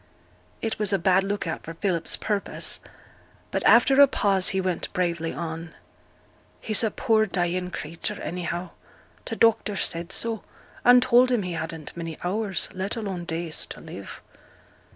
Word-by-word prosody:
It 225 -1 -2
was 210 -2 +2
a 195 - +3
bad 190 +1 +3
look 200 +1 -2
out 165 - -3
for 165 - -8
Philip's 175 -2 0
purpose; 205 -2 -2 0.7
but - - -1
after 270 +1 +6
a 280 - +9
pause 195 -7 +3
he 190 - 0
went 185 -2 -2
bravely 170 -2 -1
on. 165 0 -6 0.8
'He's 215 +1 +2
a 220 - +3
poor 220 -1 +2
dying 180 -1 -1
creature, 165 -1 -4
anyhow. 175 +1 -4 0.5
T' - - -3
doctor 225 -2 +3
said 170 -1 -2
so, 225 +2 -1 0.4
and 245 0 +7
told 255 0 +5
him 240 -5 +1
he 180 -1 -4
hadn't 160 -1 -6
many 165 -2 -5
hours, 195 +2 -1
let 190 +3 -2
alone 190 -6 -4
days, 165 -1 -3
to - - -9
live.' - - -10
185 Hz, 155 wpm, -25 LUFS, 170-215 Hz, 0.8 s, a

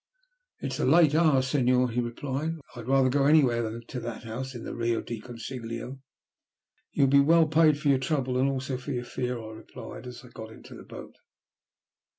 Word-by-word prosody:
"It's 135 -1 -4
a - - +1
late 155 +1 +5
hour, 155 -5 +4
Senor," 125 -2 +2
he 120 +2 0
replied, 135 +6 -3
"and 165 - -10
I'd 120 -1 -8
rather 135 0 +4
go 135 +2 +2
anywhere 135 -6 +4
than 115 +1 -5
to 125 - -6
that 120 -1 -6
house 125 +3 -6
in 120 - -7
the - - -6
Rio 115 -1 0
del 115 -2 -6
Consiglio." 120 +1 -7 0.9
"You - - +1
will 135 - +3
be 140 - +7
well 165 +3 +5
paid 155 -1 +4
for 150 -2 0
your 135 -2 +4
trouble 130 -2 -1
and 135 +1 +3
also 135 -1 -3
for 130 +3 -5
your 125 -1 -3
fear," 125 -1 -3
I 110 -1 -8
replied 110 +3 -10
as 125 0 -9
I - - -14
got 110 -2 -10
into - - -13
the - - -10
boat. - - -11
130 Hz, 205 wpm, -27 LUFS, 120-140 Hz, 0.9 s, be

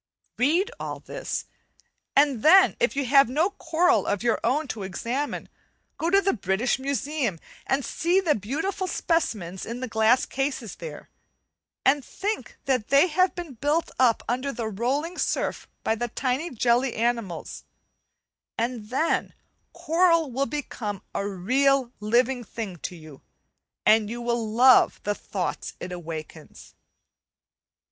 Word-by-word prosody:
Read 340 - +2
all - - -5
this, - - -5 0.7
and 280 -5 +4
then 380 - +7
if - - +1
you 280 -1 0
have 275 0 +5
no 315 +9 +1
coral 350 0 +2
of 205 +1 -1
your 235 -1 +2
own 295 +3 +1
to 225 -4 -5
examine, 235 +9 -3 0.5
go 330 - 0
to 390 +2 +5
the 395 0 +1
British 195 +6 0
Museum 275 - -1 0.3
and 270 0 +1
see 350 +3 +1
the 340 -6 +2
beautiful 320 - -3
specimens 210 - -1
in 235 +2 -5
the 255 - -4
glass 220 +2 +3
cases 270 -5 -3
there, - - -9 0.7
and 275 +1 +4
think 415 +9 -4
that 255 -5 0
they 280 +4 +5
have 370 +3 +2
been 345 -5 -6
built 290 +7 0
up 245 -3 +4
under 255 +4 -1
the 235 -4 -4
rolling 265 - -2
surf - - -1 0.2
by - - +2
the 240 +2 -2
tiny 260 +7 -2
jelly 245 0 +1
animals; 230 -7 -2 0.9
and 230 -2 -3
then 290 +7 0 0.4
coral 335 -2 +2
will 275 +3 0
become 215 -9 -5
a 200 - -2
real 255 +7 +2
living 240 +4 +1
thing 215 -4 -6
to 175 - -6
you, 155 -4 -13 0.6
and 215 -1 +5
you 235 +1 -5
will 235 -2 -1
love 255 +3 +6
the 205 - 0
thoughts 190 -3 -4
it 180 - -6
awakens. 165 -3 -8
255 Hz, 140 wpm, -25 LUFS, 220-300 Hz, 0.9 s, then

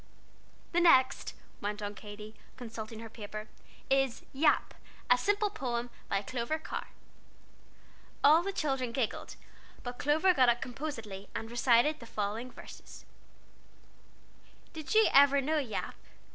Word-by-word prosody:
"The 350 - +2
next," 275 -6 +4 0.3
went 210 +1 -3
on 205 -1 -4
Katy, 210 +1 -10 0.2
consulting 225 -2 -7
her 225 - -7
paper, 215 -1 -7 0.4
"is 270 -3 +1
'Yap,' 295 +3 +2 0.4
a - - +9
Simple 410 - +1
Poem, 245 - -3 0.2
by 195 0 0
Clover 245 +7 -2
Carr." 315 - -6 1.4
All 305 +4 +7
the 395 +3 -2
children 270 -9 -1
giggled, 235 -3 -2 0.5
but 245 -1 -6
Clover 315 +6 +3
got 255 -6 +5
up 240 0 +2
composedly, 225 -8 -6
and 225 +1 -4
recited 240 +5 +3
the 235 - -11
following 215 +4 -3
verses: - - -12 1.7
"Did 315 +5 -4
you 440 0 +7
ever 280 0 +7
know 305 +3 +1
Yap? 255 -7 -3
250 Hz, 130 wpm, -31 LUFS, 225-295 Hz, 1.7 s, a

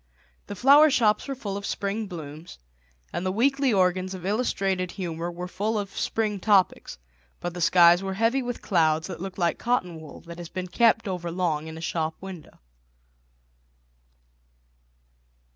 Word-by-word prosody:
The 205 - -6
flower 285 +8 +7
shops 220 -6 +2
were 275 - -3
full 205 -6 -5
of 200 - -7
spring 205 +2 -2
blooms, 160 -2 -9 0.6
and - - -2
the 185 - 0
weekly 270 +5 +2
organs 185 -1 +1
of 180 -1 -9
illustrated 195 -4 -1
humour 170 -3 -4
were 175 +1 -6
full 210 +5 -2
of 200 -1 -4
spring 215 -3 -1
topics, 195 -1 +2 0.4
but 175 0 -4
the 175 - -6
skies 175 +1 +6
were 195 -1 -3
heavy 230 +6 +2
with 245 -1 -5
clouds 160 -4 +2
that - - -7
looked 190 -1 -6
like 170 -3 0
cotton 180 -9 -1
wool 155 - -11
that 170 0 -10
has 170 -2 -7
been 185 0 -5
kept 225 +2 +3
over 180 -2 -3
long 165 -3 -1
in 160 0 -8
a - - -8
shop 160 -1 -2
window. 190 -4 -10
185 Hz, 160 wpm, -26 LUFS, 170-215 Hz, 0.6 s, flower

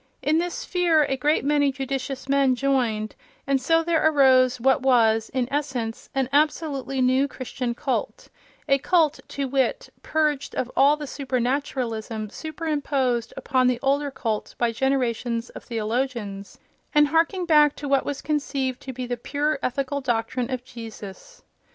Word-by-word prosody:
In 310 +2 +3
this 355 +9 -3
fear 345 -4 +3
a 270 - -1
great 290 +2 +1
many 285 -1 +3
judicious 270 0 -4
men 275 -2 +3
joined, 240 -5 0 0.3
and 275 -1 +1
so 325 +5 +3
there 335 -1 +1
arose 260 -4 +4
what 265 +2 +3
was, 225 -4 +3
in 255 -2 -1
essence, 255 -6 -3
an 265 -2 +1
absolutely 290 -3 0
new 260 +2 +3
Christian 250 -2 -4
cult—a 275 +1 -3
cult, 315 0 +2
to 275 -1 -3
wit, 265 -2 -1
purged 300 -3 -1
of 250 - -2
all 285 +2 +5
the 300 - -6
supernaturalism 245 -5 -2
superimposed 285 -6 -2
upon 255 -1 +1
the 250 -1 +2
older 280 +1 +1
cult 225 -5 -3
by 235 -1 +1
generations 240 -2 -1
of - - -10
theologians, 225 -3 -3 0.4
and 295 -1 +5
harking 335 +4 +1
back 300 -3 +5
to 290 - -6
what 275 -1 +2
was 285 -1 -4
conceived 275 -4 -2
to 260 - -7
be 255 0 -5
the 245 0 -3
pure 290 +4 -1
ethical 275 +2 -2
doctrine 240 0 -1
of 255 -2 -3
Jesus. 230 - -10
270 Hz, 150 wpm, -24 LUFS, 245-290 Hz, 0.4 s, all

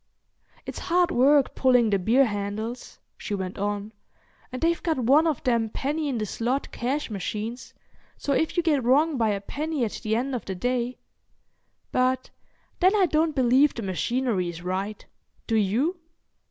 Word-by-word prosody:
"It's - - -6
hard 355 +1 +2
work 275 +1 +4
pulling 245 -4 +3
the 200 - +2
beer 235 +9 +4
handles," 215 +3 -4 0.2
she 205 - -3
went 190 -1 -5
on, 205 +1 -3 0.6
"and 255 - -5
they've 335 +3 +1
got 325 -3 0
one 275 +7 +4
of 305 -6 -1
them 235 -4 +1
penny 295 +6 -2
in 255 - -1
the 215 - -1
slot 245 +6 -2
cash 260 +2 -2
machines, 215 +5 -5 0.4
so 280 - -1
if 320 +5 0
you 345 - +3
get 295 -6 +2
wrong 290 +6 +3
by 225 -2 +2
a 200 -1 0
penny 295 +5 -2
at 215 - -5
the 220 0 0
end 260 +4 -1
of 245 - -4
the 190 - -4
day—but 255 +2 -4 0.5
then 370 +3 +4
I 395 -3 +4
don't 315 -1 +1
believe 260 +3 +4
the 230 - -5
machinery 200 0 -1
is 170 0 -8
right. 190 +4 -3 0.4
Do 225 - 0
you?" 230 - +1
245 Hz, 165 wpm, -25 LUFS, 215-290 Hz, 0.6 s, work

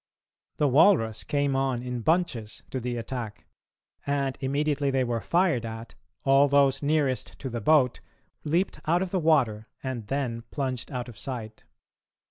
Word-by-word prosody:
The 150 - +3
walrus 130 - +4
came 140 -1 0
on 135 -2 0
in 125 -1 -3
bunches 145 -8 0
to 130 - -2
the 120 0 -3
attack, 115 -3 -5 0.6
and, 140 -2 -1
immediately 145 +1 0
they 135 -1 +2
were 120 -2 -1
fired 170 -8 +2
at, 115 0 -7 0.3
all 135 +1 +6
those 140 -1 +3
nearest 145 -3 0
to 130 - -6
the 120 0 -3
boat 140 0 +3 0.4
leaped 170 +6 0
out 175 +3 +3
of 185 - -5
the 190 - +1
water, 130 -10 +2 0.2
and 125 -5 -4
then 125 -3 -2
plunged 130 -4 -3
out 125 -2 -4
of 115 -4 -10
sight. 110 -3 -6
135 Hz, 155 wpm, -27 LUFS, 120-145 Hz, 0.6 s, all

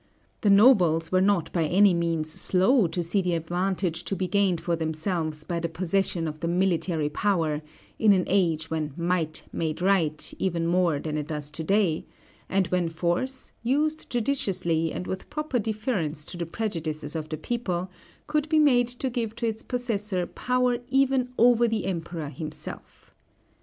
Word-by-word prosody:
The 210 - +3
nobles 185 -7 +5
were 185 0 +3
not 195 -4 +1
by 165 -3 +1
any 190 +4 +5
means 165 -2 -1
slow 190 - +3
to 175 +1 -2
see 185 +4 +1
the 180 -2 0
advantage 175 +1 -1
to 195 - -2
be 185 -1 -2
gained 190 -2 +2
for 170 +1 -1
themselves 160 -1 -2
by 170 +1 -2
the 170 0 -2
possession 175 0 0
of 155 0 -6
the 170 - -2
military 175 -3 +1
power 160 -2 0 0.4
in 215 -2 +5
an 185 -2 +4
age 165 -5 +1
when 155 -3 -2
might 170 -2 -1
made 160 -1 -2
right, 175 -5 +2
even 170 -3 0
more 170 -2 +2
than 155 +1 -3
it 150 -1 -3
does 150 -2 -4
to 160 - -4
day, 190 -2 +2 0.5
and 190 0 +2
when 180 -2 +1
force, 175 +11 -2
used 300 +6 0
judiciously 185 - 0
and 180 - -5
with 190 +1 -5
proper 300 -4 -1
deference 205 - -2
to 180 - -6
the 170 -1 -4
prejudices 165 -7 -3
of 155 -1 -4
the 155 - -3
people, 185 -2 -3 0.3
could 300 0 -1
be 315 - +3
made 255 -6 +5
to 245 +2 -3
give 230 -3 -2
to 235 - -3
its 220 -1 -1
possessor 210 -7 -2
power 250 +2 0
even 265 -1 +2
over 240 0 +5
the 220 -4 -1
Emperor 165 -4 -4
himself. 155 +2 -8
180 Hz, 170 wpm, -26 LUFS, 165-215 Hz, 0.5 s, nobles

